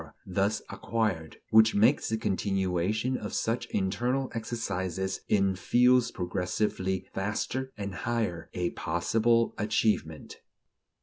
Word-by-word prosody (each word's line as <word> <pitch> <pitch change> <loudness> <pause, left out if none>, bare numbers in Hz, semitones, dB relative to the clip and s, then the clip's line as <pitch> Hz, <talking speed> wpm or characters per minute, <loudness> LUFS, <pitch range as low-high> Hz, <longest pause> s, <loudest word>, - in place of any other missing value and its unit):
thus 100 +3 0
acquired, 105 -9 -2
which 110 0 +6
makes 115 +8 +3
the 110 - 0
continuation 95 +3 0
of 105 -4 -4
such 115 +2 -1
internal 120 +7 -1
exercises 95 -5 -3
in 95 -2 +3
fields 125 +5 +4
progressively 95 +1 -2
vaster 115 +6 -2
and 100 -1 -4
higher, 105 -5 -2
a 90 -1 -1
possible 115 +8 +1
achievement. 105 -7 -1
105 Hz, 105 wpm, -29 LUFS, 95-115 Hz, -, which